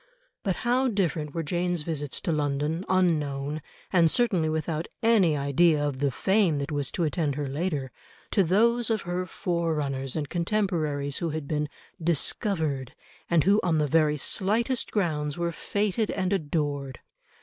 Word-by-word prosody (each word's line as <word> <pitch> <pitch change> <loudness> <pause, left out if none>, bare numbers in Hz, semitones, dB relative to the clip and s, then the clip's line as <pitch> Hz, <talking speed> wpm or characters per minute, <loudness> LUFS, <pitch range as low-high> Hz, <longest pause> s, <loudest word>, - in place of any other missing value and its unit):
But 190 -4 -1
how 255 +2 +3
different 170 - -1
were 165 - -1
Jane's 175 +1 -1
visits 150 -3 -2
to - - -1
London, 150 +2 -1
unknown, 150 -5 +1 0.3
and 170 -3 +5
certainly 185 -7 +2
without 160 +1 -2 0.2
any 200 -9 +4
idea 145 +2 +3
of 135 -3 -4
the 140 0 +2
fame 190 - +2
that 140 +2 -3
was 145 -3 -1
to 175 - 0
attend 155 -3 0
her 145 -1 -2
later, 140 -2 -2 0.4
to 200 - +4
those 230 +7 +3
of 220 -3 0
her 180 +1 -2
forerunners 150 -7 -2
and 150 -2 -2
contemporaries 165 -6 -1
who 170 - -1
had 155 -2 -4
been 150 -1 -1 0.3
"discovered," 160 - -1 0.3
and 170 -3 +4
who 200 +2 +4
on 170 -3 +1
the 150 - +2
very 150 0 +3
slightest 225 - +1
grounds 150 -7 -1
were 170 0 -1
fêted 205 +4 -1
and 185 +1 0
adored. 145 -6 -2
160 Hz, 155 wpm, -27 LUFS, 145-185 Hz, 0.4 s, and